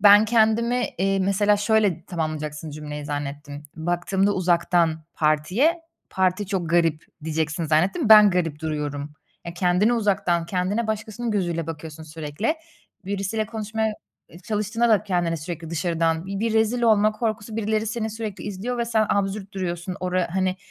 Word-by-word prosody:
Ben 205 +1 +8
kendimi, 230 +2 +2
iii, 195 0 +1
mesela 205 +2 +3
şöyle 205 -4 +1
tamamlayacaksın 155 -2 -4
cümleyi 150 0 -6
zannettim. 145 0 -5
Baktığımda 175 +4 0
uzaktan 170 -3 +1
partiye, 180 - +2 0.3
parti 190 +1 +1
çok 180 -4 -2
garip 165 -3 +2 0.2
diyeceksin, 160 +1 -1
zannettim. 180 - +1
Ben 210 -2 +9
garip 165 -5 -1
duruyorum. 150 -2 -3 0.3
Ya, 170 - -6
kendini 180 +5 +2
uzaktan, 190 -6 +1
kendine 190 +5 -1
başkasının 220 +2 -3
gözüyle 175 -6 -1
bakıyorsun 160 -1 -7
sürekli. 155 - -3 0.5
Birisiyle 200 +2 -2
konuşmaya, 220 0 -2 0.3
eee, 170 - -14
çalıştığında 215 +4 -1
da 215 -3 +4
kendine 175 -4 0
sürekli 165 +1 -6
dışarıdan, 165 0 0
bi 195 +1 -4
bir 230 0 0
rezil 225 +2 +2
olma 215 -2 +4
korkusu, 220 -1 -3
birileri 220 0 0
seni 220 0 -2
sürekli 215 -2 -6
izliyor 210 +5 -4
ve 235 - +1
sen 220 -2 +1
absürt 200 0 -1
duruyorsun. 180 -1 -4
Ora 180 -1 0
hani, 185 0 +1
190 Hz, 145 wpm, -24 LUFS, 165-215 Hz, 0.5 s, Ben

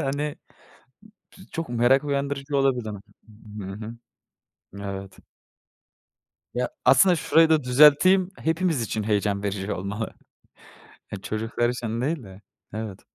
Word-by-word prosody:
hani 145 +2 -2 1.0
ç - - -19
çok 165 -3 -4
merak 120 +4 +3
uyandırıcı 140 0 -2
olabilir 135 -4 +1
hani. 105 -2 -6 0.6
Hı 95 0 -6
hı, 115 +2 -7 0.9
evet. 100 -1 -7 1.4
Ya, 125 0 0 0.2
aslında 180 +6 +6
şurayı 160 +1 +4
da 155 -4 +3
düzelteyim, 150 +8 +6
hepimiz 165 -5 0
için 110 -1 -2
heyecan 100 -1 0
verici 100 0 -3
olmalı. 100 +4 -4 1.0
E, - - -3
çocuklar 115 +2 -1
için 115 -2 -3
değil 145 +3 -1
de. 95 +1 -13 0.3
Evet. 110 -3 -5
125 Hz, 120 wpm, -25 LUFS, 105-145 Hz, 1.4 s, aslında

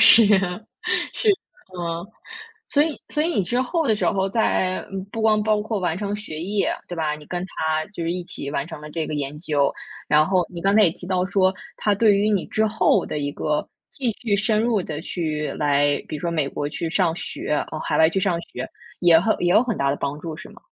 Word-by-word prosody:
是， 230 -1 +9 0.9
是。 440 - 0 0.5
嗯。 170 +1 -3 0.6
所 290 - +5
以 310 -2 -1
所 300 - +1
以 330 - +1
你 260 - +1
之 240 +8 0
后 325 +4 0
的 220 - +4
时 - - -1
候 195 -2 +1
在 190 -3 +1
嗯， 195 -1 -4
不 220 +2 -5
光 215 -1 +4
包 210 -1 +2
括 220 -1 -2
完 175 -2 0
成 205 -1 -2
学 205 -7 -7
业， 200 +2 0 0.2
对 175 - -5
吧？ 155 -2 0
你 150 - -13
跟 175 0 -3
他 155 -3 -1
就 170 - -4
是 170 - 0
一 180 0 -2
起 140 -4 -6
完 140 0 -2
成 155 - -8
了 150 - -8
这 160 0 -2
个 - - -4
研 145 0 -3
究。 145 -5 +1 0.4
然 150 +1 +5
后 185 -2 +2
你 170 -1 -7
刚 195 +1 +3
才 220 - +7
也 170 - +4
提 180 - -11
到 185 -1 +1
说， 190 0 +2 0.2
他 210 - +2
对 205 0 +4
于 210 +1 +2
你 200 -4 +1
之 220 0 +1
后 220 +1 +2
的 150 - -3
一 145 0 -2
个 150 +1 -1 0.2
继 250 -5 0
续 210 -4 +2
深 215 +1 +2
入 230 -4 +1
地 155 -3 -5
去 155 -4 -2
来 145 -1 +3
比 155 - -3
如 - - -9
说 170 +1 -1
美 155 -4 0
国 145 +1 -3
去 165 +2 -4
上 170 -2 +2
学 150 - -3 0.2
呃， 155 - -3
海 - - -1
外 160 +1 +6
去 190 - 0
上 185 -3 +1
学， - - -7 0.3
也 170 -2 +7
很 220 +5 +2
也 175 - +2
有 220 - +6
很 235 -5 -2
大 140 - +2
的 140 - -1
帮 140 +1 -3
助 160 -1 -6
是 - - -10
吗？ - - -16
180 Hz, 255 characters per minute, -23 LUFS, 155-210 Hz, 0.9 s, 是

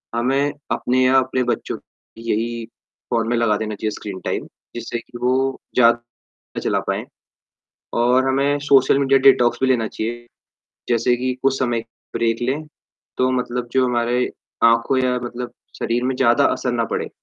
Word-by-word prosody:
हमें 135 +4 +1 0.2
अपने 130 +1 +1
या 130 +1 +5
अपने 130 0 0
बच्चों 120 - -2 0.4
यही 115 +1 -2 0.4
फोन 115 -2 0
में 120 - +1
लगा 110 -3 +2
देना 110 0 -3
चाहिए 110 +1 -2
स्क्रीन 100 -2 -7
टाइम - - -2 0.3
जिससे 120 0 -4
कि 120 - -11
वो 130 +2 +1 0.2
ज़्यादा 120 -1 +2 0.4
चला - - +1
पाएँ - - -1 1.0
और 130 +2 +3
हमें 140 +2 +2
सोशल 135 0 +5
मीडिया 135 -1 +4
डिटॉक्स 120 -3 +4
भी - - +4
लेना 120 -4 +2
चाहिए 120 +2 -5 0.6
जैसे 120 +1 +2
कि 130 +1 -1
कुछ 135 0 +2
समय 120 -2 0 0.4
ब्रेक 115 0 0
लें, 140 +6 -1 0.5
तो 130 0 +3
मतलब 125 -1 -2
जो 130 -1 +3
हमारी 120 0 +1 0.4
आँखों 115 +3 +4
या 125 -1 +1
मतलब 120 0 -6 0.3
शरीर 120 +1 -1
में 130 +1 0
ज़्यादा 130 +2 +4
असर 125 - -2
ना 115 -1 +1
पड़े। - - -2
120 Hz, 160 wpm, -21 LUFS, 115-130 Hz, 1.0 s, या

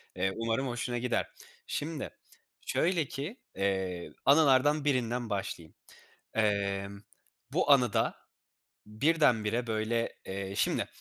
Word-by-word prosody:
Eee, 95 +1 0
umarım 115 +4 -1
hoşuna 120 0 -2
gider. 120 0 0 0.4
Şimdi 155 -1 -3 0.6
şöyle 170 -2 +1
ki, 150 - -5 0.2
eee, 95 -2 -1
anılardan 145 0 +5
birinden 125 -3 0
başlayayım. 95 -5 -4 0.6
Emm, 100 -2 0 0.5
bu 145 - +3
anı 125 -5 +5
da 115 -1 +1 0.7
birdenbire, 120 -2 +2
böyle 115 +1 0
eee, 95 0 -4
şimdi, - - +1
115 Hz, 105 wpm, -30 LUFS, 100-135 Hz, 0.7 s, anılardan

